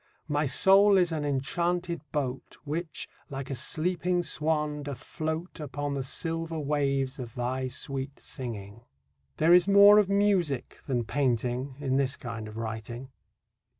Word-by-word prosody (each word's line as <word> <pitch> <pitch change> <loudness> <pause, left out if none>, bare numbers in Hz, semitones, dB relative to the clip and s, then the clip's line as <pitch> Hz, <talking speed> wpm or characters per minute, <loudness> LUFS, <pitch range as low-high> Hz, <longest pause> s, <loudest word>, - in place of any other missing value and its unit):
My 145 -1 +1
soul 195 +7 +6
is 175 -2 +3
an 155 -2 -2
enchanted 170 +6 -1
boat 135 -3 -3
Which, 155 +1 -4 0.2
like 135 -1 -5
a - - -1
sleeping 175 +6 0
swan, 150 -2 0
doth 140 -1 -7
float 160 +2 -4
Upon 145 -1 -4
the 140 - -2
silver 165 +4 -2
waves 140 -2 0
of 120 -3 -7
thy 130 +1 -2
sweet 135 +1 -4
singing. 110 -4 -7 0.6
There 165 +3 +5
is 180 +1 +6
more 200 +1 +8
of 200 -2 +2
music 195 -10 +1
than 125 -4 0
painting 125 0 -1
in 135 -2 0
this 135 -1 +1
kind 115 -3 -6
of 110 +1 -9
writing. 115 +3 -6
145 Hz, 145 wpm, -28 LUFS, 130-170 Hz, 0.6 s, more